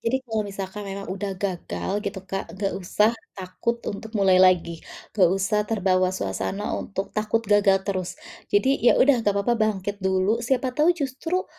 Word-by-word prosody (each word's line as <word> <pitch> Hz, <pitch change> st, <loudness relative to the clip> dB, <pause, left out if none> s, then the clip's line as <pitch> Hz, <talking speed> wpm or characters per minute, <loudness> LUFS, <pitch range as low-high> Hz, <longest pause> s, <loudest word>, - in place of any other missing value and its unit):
Jadi 230 Hz, +3 st, +1 dB
kalau 220 Hz, -3 st, -1 dB
misalkan 195 Hz, +1 st, -6 dB
memang 195 Hz, 0 st, -6 dB
udah 195 Hz, 0 st, -4 dB
gagal 185 Hz, -1 st, -4 dB
gitu, 200 Hz, -1 st, -4 dB
Kak, 195 Hz, +1 st, -4 dB
nggak 195 Hz, 0 st, -1 dB
usah 210 Hz, +5 st, +2 dB, 0.2 s
takut 190 Hz, +5 st, -3 dB, 0.2 s
untuk 220 Hz, +2 st, -8 dB
mulai 190 Hz, -2 st, +4 dB
lagi, 175 Hz, -3 st, +3 dB, 0.3 s
nggak 185 Hz, -5 st, +4 dB
usah 200 Hz, +2 st, +1 dB
terbawa 185 Hz, -4 st, +2 dB
suasana 205 Hz, +2 st, -3 dB
untuk 195 Hz, 0 st, -5 dB
takut 215 Hz, +2 st, 0 dB
gagal 200 Hz, -1 st, +4 dB
terus. 185 Hz, -3 st, -2 dB, 0.4 s
Jadi 265 Hz, +7 st, +2 dB
ya 240 Hz, -, +5 dB
udah 260 Hz, -3 st, +5 dB
nggak 205 Hz, -2 st, +1 dB
papa 220 Hz, +4 st, +1 dB
bangkit 205 Hz, -2 st, 0 dB
dulu, 190 Hz, +4 st, +1 dB
siapa 255 Hz, +1 st, 0 dB
tahu 300 Hz, +5 st, +2 dB
justru 315 Hz, +6 st, -2 dB
200 Hz, 165 wpm, -24 LUFS, 190-225 Hz, 0.4 s, ya